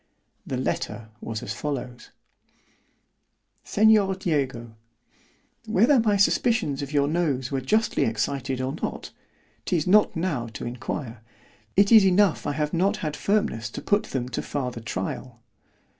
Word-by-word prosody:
The 130 Hz, -, -2 dB
letter 115 Hz, -3 st, -3 dB
was 110 Hz, -1 st, -5 dB
as -, -, -4 dB
follows: 130 Hz, -4 st, -5 dB, 1.5 s
"Seig. 210 Hz, -3 st, +3 dB
DIEGO, 130 Hz, -8 st, -1 dB, 0.9 s
"Whether 230 Hz, +6 st, +4 dB
my 215 Hz, -3 st, +2 dB
suspicions 200 Hz, -, +2 dB
of 140 Hz, 0 st, -5 dB
your 145 Hz, -1 st, +2 dB
nose 145 Hz, -6 st, -1 dB
were 135 Hz, -1 st, -1 dB
justly 215 Hz, -, +1 dB
excited 125 Hz, +4 st, -2 dB
or 130 Hz, +1 st, -2 dB
not——'tis 170 Hz, -5 st, -5 dB
not 210 Hz, +3 st, +4 dB
now 165 Hz, -9 st, -2 dB
to -, -, -6 dB
inquire—it 115 Hz, -, -3 dB
is 220 Hz, -3 st, +9 dB
enough 190 Hz, -1 st, +3 dB
I 145 Hz, -, 0 dB
have 150 Hz, 0 st, -2 dB
not 195 Hz, +5 st, +1 dB
had 150 Hz, -1 st, -2 dB
firmness 200 Hz, -, 0 dB
to -, -, -7 dB
put 205 Hz, +1 st, +1 dB
them 125 Hz, -2 st, -3 dB
to 125 Hz, -, -3 dB
farther 125 Hz, -4 st, -4 dB
tryal. 115 Hz, +4 st, -5 dB
145 Hz, 130 wpm, -25 LUFS, 125-195 Hz, 1.5 s, is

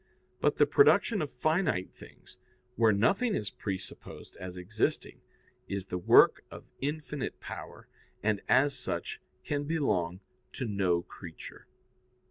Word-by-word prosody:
But -, -, +2 dB
the -, -, +6 dB
production 240 Hz, -, +4 dB
of 150 Hz, -, -2 dB
finite 155 Hz, -, 0 dB
things, -, -, -14 dB, 0.4 s
where 115 Hz, -2 st, +4 dB
nothing 195 Hz, -, +2 dB
is 105 Hz, -2 st, -3 dB
presupposed 95 Hz, -2 st, -7 dB
as 90 Hz, 0 st, -7 dB
existing, 100 Hz, +5 st, -2 dB, 0.5 s
is 100 Hz, -1 st, -3 dB
the 90 Hz, -2 st, -4 dB
work 90 Hz, -, +6 dB
of -, -, -11 dB, 0.2 s
infinite 150 Hz, 0 st, -4 dB
power, -, -, -9 dB, 0.4 s
and, 105 Hz, -1 st, +1 dB
as 140 Hz, +1 st, +4 dB
such, -, -, -4 dB, 0.2 s
can 145 Hz, -1 st, -2 dB
belong 95 Hz, -, 0 dB, 0.3 s
to 130 Hz, -, -3 dB
no 95 Hz, -5 st, +1 dB
creature. 85 Hz, -3 st, -11 dB
110 Hz, 125 wpm, -30 LUFS, 95-150 Hz, 0.5 s, the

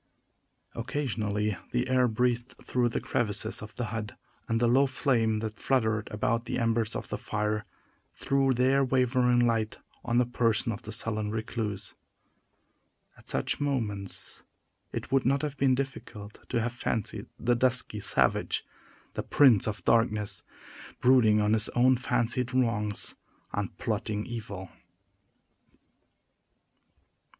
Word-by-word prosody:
Occasionally 105 Hz, -5 st, -2 dB
the 120 Hz, +1 st, 0 dB
air 130 Hz, -1 st, +3 dB
breathed 120 Hz, +2 st, 0 dB
through 125 Hz, -1 st, +1 dB
the -, -, -2 dB
crevices 110 Hz, -1 st, -1 dB
of 105 Hz, 0 st, -9 dB
the 120 Hz, -, -2 dB
hut, 110 Hz, -2 st, -4 dB, 0.3 s
and 115 Hz, 0 st, +1 dB
the 120 Hz, -, +3 dB
low 135 Hz, +4 st, +4 dB
flame 115 Hz, -5 st, +1 dB
that 110 Hz, -1 st, -5 dB
fluttered 110 Hz, -5 st, +1 dB
about 115 Hz, +2 st, 0 dB
the -, -, -2 dB
embers 115 Hz, -2 st, 0 dB
of -, -, -5 dB
the -, -, -3 dB
fire 105 Hz, 0 st, -2 dB, 0.5 s
threw 135 Hz, -1 st, +1 dB
their 130 Hz, +2 st, +3 dB
wavering 125 Hz, -1 st, +3 dB
light 115 Hz, -2 st, 0 dB, 0.3 s
on 120 Hz, 0 st, 0 dB
the 125 Hz, -, +4 dB
person 115 Hz, -1 st, +1 dB
of 105 Hz, -, -6 dB
the 110 Hz, -, -8 dB
sullen 110 Hz, -1 st, -1 dB
recluse. 110 Hz, -2 st, -4 dB, 1.2 s
At -, -, -19 dB
such -, -, -1 dB
moments 110 Hz, -9 st, -2 dB, 0.5 s
it -, -, -5 dB
would 135 Hz, -1 st, +3 dB
not 135 Hz, +4 st, +2 dB
have 150 Hz, -2 st, -2 dB
been 135 Hz, -2 st, +3 dB
difficult 120 Hz, -6 st, -6 dB
to -, -, +1 dB
have 120 Hz, +1 st, -1 dB
fancied 110 Hz, -2 st, -2 dB
the 120 Hz, +1 st, +2 dB
dusky 125 Hz, -3 st, +2 dB
savage -, -, +1 dB, 0.5 s
the -, -, -2 dB
Prince 125 Hz, -9 st, +5 dB
of 105 Hz, -, -4 dB
Darkness 110 Hz, -3 st, +2 dB, 0.6 s
brooding 120 Hz, -4 st, +5 dB
on 105 Hz, +1 st, +2 dB
his 110 Hz, -1 st, +2 dB
own 130 Hz, +2 st, +5 dB
fancied 125 Hz, 0 st, 0 dB
wrongs, 105 Hz, -5 st, 0 dB, 0.4 s
and -, -, -3 dB
plotting 105 Hz, -1 st, -2 dB
evil. 105 Hz, -6 st, -6 dB
115 Hz, 135 wpm, -29 LUFS, 105-125 Hz, 1.2 s, Prince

